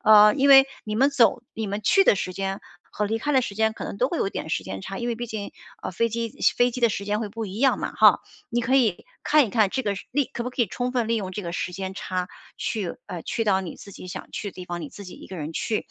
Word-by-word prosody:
啊， 210 0 +8
因 280 0 +3
为 270 0 +9 0.2
你 215 0 -3
们 270 +4 +5
走 245 -3 +3
你 220 -1 -3
们 205 +1 -3
去 390 - +5
的 - - +6
时 185 - -3
间 195 0 -3 0.3
和 210 - -2
离 225 +2 -1
开 295 - -2
的 260 -2 +4
时 200 - -5
间 220 +1 +2
可 - - -6
能 - - -5
都 255 - +2
会 340 - -2
有 - - +1
点 160 - -5
时 95 - -1
间 95 +1 -6
差， 195 - -6
因 240 - -3
为 235 - 0
毕 240 +1 -5
竟， 215 -3 -5 0.3
呃， - - -3
飞 230 +6 +1
机 230 0 -3 0.3
飞 245 0 +4
机 250 +1 -6
的 235 - +5
时 200 -1 -3
间 210 +1 -1
会 220 - -3
不 225 +2 -5
一 195 0 -6
样 270 +2 +3
嘛。 - - -3
哈， - - +6 0.3
你 240 -1 -1
可 260 +3 +1
以 225 -9 +2 0.2
看 300 -3 +4
一 - - -8
看 215 -3 +3
这 260 +6 -2
个 205 -4 -1 0.2
利 285 0 +2
可 235 - -3
不 250 - -3
可 250 -1 0
以 - - 0
充 245 +6 -3
分 240 -3 0
利 230 - +1
用 190 -4 -3
这 205 +2 -5
个 170 - -5
时 180 - -3
间 190 +1 -4
差 185 -2 -3 0.3
去 205 -6 -3
哎， 180 - -6
去 225 - -2
到 195 -3 +3
你 180 -4 -7
自 200 - -12
己 185 - -10
想 - - -7
去 205 - -4
的 - - -23
地 180 - -8
方， 175 -1 -5
你 155 - -6
自 200 - -11
己 185 - -9
一 - - -11
个 190 - -8
人 155 0 -5
去， 215 +6 -2
215 Hz, 325 characters per minute, -25 LUFS, 190-240 Hz, 0.3 s, 为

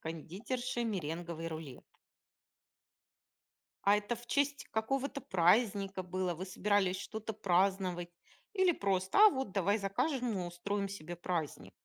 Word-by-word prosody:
кондитерши 235 - -4
меренговый 170 -5 -3
рулет. 155 -5 -7 2.0
А 200 +1 +6
это 210 +3 -3
в 240 +1 -13
честь 285 +2 0
какого-то 270 +5 -1
праздника 195 +1 +2
было, 185 -1 -2
вы 185 +4 -6
собирались 190 0 +1
что-то 220 +2 -5
праздновать, 185 -2 +1 0.5
или 375 -2 +4
просто: 190 - 0
"А 430 +1 +10
вот 265 - -3
давай 200 +2 +2
закажем 240 +5 0
и 180 - -2
устроим 200 +3 -2
себе 175 -3 -7
праздник"? 160 - -3
195 Hz, 120 wpm, -33 LUFS, 175-225 Hz, 2.0 s, А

